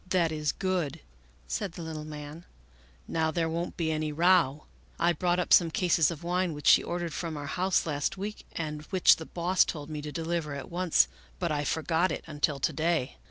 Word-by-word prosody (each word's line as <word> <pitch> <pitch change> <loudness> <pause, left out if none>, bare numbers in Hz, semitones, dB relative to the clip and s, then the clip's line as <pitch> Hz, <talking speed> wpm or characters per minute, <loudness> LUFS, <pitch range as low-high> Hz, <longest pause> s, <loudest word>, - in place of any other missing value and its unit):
" 185 - -23
That 175 -3 +2
is 150 -1 0
good," 175 -6 -2 0.5
said 65 - -3
the 170 - -7
little 155 -1 -6
man, 150 +2 -8 0.3
" - - -29 0.3
now 160 -1 0
there 165 0 0
won't 170 +2 -3
be 160 -2 0
any 155 -1 -1
row. 165 -3 +3 0.3
I 170 +1 +3
brought 175 0 +1
up 180 - +2
some 170 -2 +6
cases 170 -4 +3
of 170 -2 -6
wine 180 0 0
which 150 0 -9
she - - +7
ordered 175 -2 -3
from 165 -3 -4
our 145 - -5
house 180 +5 +1
last 150 +4 -1
week 205 +2 -6
and 150 -2 -4
which 185 -2 +5
the 160 - -8
Boss 180 +2 +2
told 150 -1 -6
me 150 -1 -4
to 150 0 -6
deliver 165 -2 -2
at 140 - -8
once, 175 -1 +3 0.3
but 170 -3 -1
I 145 -1 0
forgot 160 +4 +1
it - - -4
until 150 -2 -1
to 155 - 0
day. 160 -3 0
165 Hz, 210 wpm, -29 LUFS, 150-175 Hz, 0.5 s, she